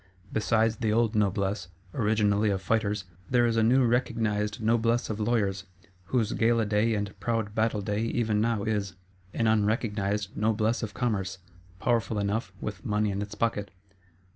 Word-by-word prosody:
Besides 110 0 +2
the 110 -2 0
old 115 0 +2
Noblesse, 100 -2 0 0.3
originally 105 -2 +2
of 100 -1 0
Fighters, 105 +1 0 0.3
there 120 -1 +4
is 115 -1 +1
a 115 - +3
new 125 +3 +4
recognised 110 -3 0
Noblesse 115 +1 +1
of 110 - -4
Lawyers; 105 -4 0 0.4
whose 110 +1 0
gala 115 0 +2
day 105 +2 +2
and 105 -1 -3
proud 115 -3 -1
battle 110 -1 +1
day 105 +2 -1
even 110 -3 0
now 115 -2 +1
is. 100 -4 -1 0.4
An 115 - -1
unrecognised 105 -2 0
Noblesse 110 +1 +1
of 110 -2 -5
Commerce; 100 -6 -1 0.4
powerful 115 -2 +1
enough, 100 -1 -1
with 100 -3 -6
money 105 -3 0
in 100 +1 -2
its 105 0 -6
pocket. 105 -2 -1
110 Hz, 155 wpm, -28 LUFS, 105-115 Hz, 0.4 s, there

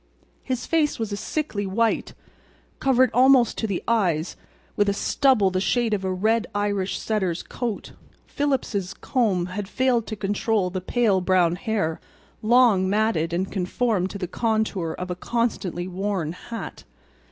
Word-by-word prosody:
His 255 -2 -3
face 315 -3 +1
was 225 -2 -3
a - - -1
sickly 205 -4 -3
white, 225 +4 0 0.6
covered 260 -2 +3
almost 255 0 +5
to 220 - -1
the 195 -4 -3
eyes 180 -8 +1 0.4
with 205 -1 +2
a - - +2
stubble 235 -6 +3
the 185 0 0
shade 235 +1 +1
of 200 -2 -1
a 190 - -1
red 215 +5 +1
Irish 205 -2 -1
setter's 190 -6 -1
coat. 235 -4 -4 0.3
Phillips's 230 -10 -2
comb 210 -9 0
had 190 +2 -5
failed 245 -3 +1
to 215 - -4
control 205 -1 0
the 185 0 -3
pale 205 -1 +2
brown 180 -2 +3
hair, 180 -5 -2 0.4
long 220 -5 +4
matted 205 -6 +1
and 185 +3 -2
conformed 190 0 0
to 200 - -6
the 185 -2 -4
contour 215 -5 -1
of 180 0 -5
a - - -2
constantly 190 -4 -2
worn 185 -3 -2
hat. 225 +6 -8
205 Hz, 150 wpm, -24 LUFS, 185-235 Hz, 0.6 s, almost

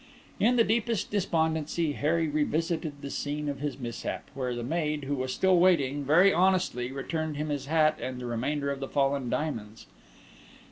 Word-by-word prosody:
In 240 +4 +4
the 235 - +5
deepest 225 -1 0
despondency, 160 -4 0
Harry 160 +3 +1
revisited 155 0 -1
the 140 - -5
scene 150 +1 -3
of 140 -2 -3
his 145 -1 -3
mishap, 120 -4 -5
where 125 -2 -2
the 120 - -4
maid, 150 +1 -1
who 140 +1 -2
was 130 -2 -2
still 185 +4 +3
waiting, 145 -6 +3
very 175 +8 +5
honestly 180 -9 +1
returned 155 +2 -3
him 150 +1 -2
his 140 -2 -3
hat 155 0 +3
and 130 0 -4
the 125 - -6
remainder 140 +5 -1
of 140 - -4
the 135 - -5
fallen 135 -2 +1
diamonds. 115 -9 -3
150 Hz, 175 wpm, -28 LUFS, 135-165 Hz, -, the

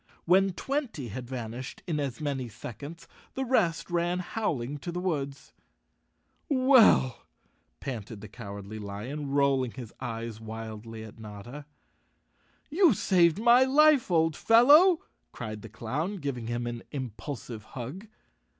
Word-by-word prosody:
When 190 +2 +4
twenty 245 - -3
had 125 +4 -6
van¬ 120 -3 -5
ished 130 +1 -7
in 160 -4 -1
as 135 -5 -3
many 135 -5 -3
seconds, 145 +10 -9 0.3
the 265 - -1
rest 185 -11 +1
ran 175 +1 +1
howling 150 - -2
to 175 - -5
the 175 - -3
woods. 140 -7 -3 1.0
"Well," 255 - +5 0.5
panted 115 -5 -6
the 105 - -9
Cowardly 100 -1 -8
Lion, 115 +9 -5
rolling 135 -3 +2
his 120 -4 -9
eyes 115 -3 -5
wildly 110 0 -7
at 110 0 -12
Notta. 110 +7 -9 1.0
"You 330 - +5
saved 175 -3 +3
my 240 +3 +6
life, 290 -1 +5
old 160 -3 +2
fellow," 295 - +6 0.3
cried 110 -3 -6
the 115 - -10
clown, 135 - -3
giving 135 -8 -4
him 120 0 -2
an 120 -1 -4
impulsive 125 -3 -6
hug. 135 - -8
140 Hz, 130 wpm, -28 LUFS, 115-180 Hz, 1.0 s, my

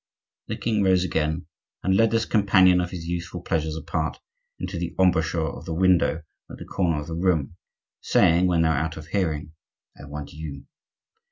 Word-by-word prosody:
The - - -4
king 110 -2 0
rose 95 -2 +3
again 80 -1 -1 0.4
and 95 0 +2
led 115 +3 +4
this 115 0 +1
companion 95 -3 +4
of 90 - -3
his 85 -3 -7
youthful 85 0 -4
pleasures 80 -2 -1
apart 80 - -3 0.4
into 90 -1 -5
the 85 -1 -4
embrasure 85 -3 +2
of - - -7
the 80 -2 -4
window 90 -2 +3 0.3
at - - -9
the - - -9
corner 85 -5 0
of 75 - -6
the 80 - -6
room, 85 -3 0 0.5
saying, 85 +1 +4
when 85 -2 +2
they 80 - +3
were - - +3
out 80 +2 -2
of 75 +1 -10
hearing:— 80 -6 -1 0.4
"I - - -11
want 75 0 -7
you. 75 -3 -7
85 Hz, 185 wpm, -24 LUFS, 80-90 Hz, 0.5 s, led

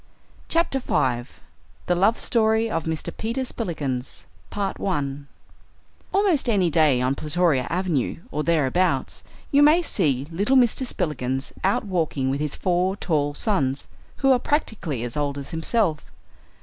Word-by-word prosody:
CHAPTER 330 -5 +1
FIVE: 125 - -1 0.5
The 180 - +2
Love 195 +6 +3
Story 220 -1 +1
of 165 -2 -2
Mr. 160 -1 -3
Peter 235 +4 -2
Spillikins 145 - -4 1.9
Almost 380 -10 +2
any 190 -6 +2
day, 150 -5 +4
on 130 +1 +2
Plutoria 150 -2 +1
Avenue 170 -4 -1
or 150 +1 -2
thereabouts, 170 +3 +1 0.3
you 285 -1 +5
may 310 +4 +6
see 140 - +1
little 205 +11 +2
Mr. 250 +1 +3
Spillikins 135 - -2
out 195 +3 +1
walking 160 -8 -1
with 140 - -2
his 150 -1 -1
four 185 +1 0
tall 145 -6 -1
sons, 140 - 0 0.4
who 270 - +6
are 255 - +4
practically 220 - -2
as 120 -1 -5
old 145 -1 -1
as 140 +3 -7
himself. 165 -1 0
170 Hz, 135 wpm, -24 LUFS, 140-220 Hz, 1.9 s, may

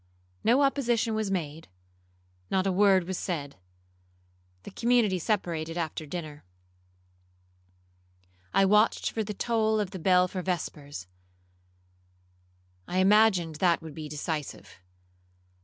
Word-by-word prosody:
No 250 +5 +4
opposition 240 -5 +1
was 215 -2 -1
made,—not 90 - -6
a 195 - +2
word 190 -1 +4
was 185 +1 -4
said. 145 - -4 1.1
The - - -9
community 230 -4 +2
separated 165 -4 -2
after 160 -2 -4
dinner. 155 -2 -7 2.1
I 195 - +4
watched 210 +3 +3
for 220 - -2
the 210 0 -6
toll 220 0 +1
of 200 -3 -2
the 190 - -7
bell 180 +1 +4
for 185 0 -5
vespers,—I 90 - -9
imagined 190 -5 +4
that 170 -1 +2
would 160 -2 -8
be 155 0 -7
decisive. 150 0 -5
170 Hz, 105 wpm, -28 LUFS, -, 2.1 s, No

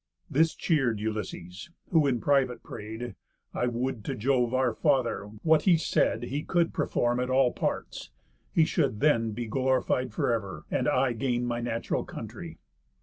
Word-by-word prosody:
This 160 +4 +3
cheer'd 135 - +1
Ulysses, 105 - -5 0.2
who 160 -5 +4
in 125 -3 +1
private 135 -2 +1
pray'd: 110 +2 -7 0.4
"I 125 - 0
would 120 -1 -2
to - - -2
Jove 125 +1 +1
our 130 -2 +2
Father, 130 -7 +1 0.2
what 160 -1 +5
he 180 -4 +6
said, 120 -6 +1
He 140 +4 -2
could 170 +1 +1
perform 120 0 0
at 125 0 -1
all 130 -1 +4
parts; - - -3 0.4
he 160 - +4
should 140 -10 0
then 115 -7 +3
Be 120 +2 -4
glorified 130 +1 0
for 120 - 0
ever, 95 -9 -4
and - - +1
I 130 -1 +2
gain 120 +1 -1
My 120 -1 -1
natural 115 -1 -2
country." - - -8
125 Hz, 160 wpm, -28 LUFS, 115-135 Hz, 0.4 s, he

